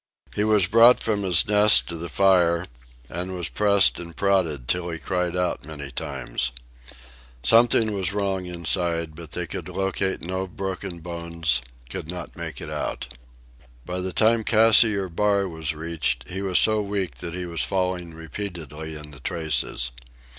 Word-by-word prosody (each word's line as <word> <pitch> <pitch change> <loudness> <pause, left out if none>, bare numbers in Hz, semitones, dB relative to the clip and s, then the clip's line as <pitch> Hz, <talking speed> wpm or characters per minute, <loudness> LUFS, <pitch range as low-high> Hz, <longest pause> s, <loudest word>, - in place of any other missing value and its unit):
He 105 - +1
was 105 -3 +4
brought 115 +5 +6
from 105 -2 -1
his 90 -4 +3
nest 105 0 +7
to 85 - -4
the 85 +1 -6
fire 90 -1 +3 0.4
and 90 +5 -5
was 90 -4 -3
pressed 100 -2 +4
and 85 -1 -9
prodded 85 -10 0
till 90 +3 -1
he 85 - -4
cried 90 0 -2
out 90 -1 -1
many 70 -2 -7
times. 65 - -3 0.9
Something 115 - +4
was 95 -1 -1
wrong 100 -2 -2
inside, 85 -1 -1
but 80 -1 -11
they - - -3
could - - -6
locate 95 0 -2
no 95 +2 -3
broken 95 -1 -5
bones, 85 -4 -2 0.3
could 70 - -6
not 90 -1 -7
make 80 -4 -6
it - - -7
out. - - -4 0.7
By 90 +1 -4
the 95 0 -3
time 110 +4 +3
Cassiar 110 -3 +5
Bar 100 +2 +1
was 80 -2 -3
reached, 75 -7 -2
he 95 +2 -5
was 95 -2 +1
so 110 -1 +4
weak 100 -5 -3
that 85 0 -6
he 90 0 -4
was 85 -3 -2
falling 90 -3 -2
repeatedly 80 -2 -7
in 75 0 -9
the 70 - -11
traces. 65 -4 -1
90 Hz, 160 wpm, -24 LUFS, 80-100 Hz, 0.9 s, nest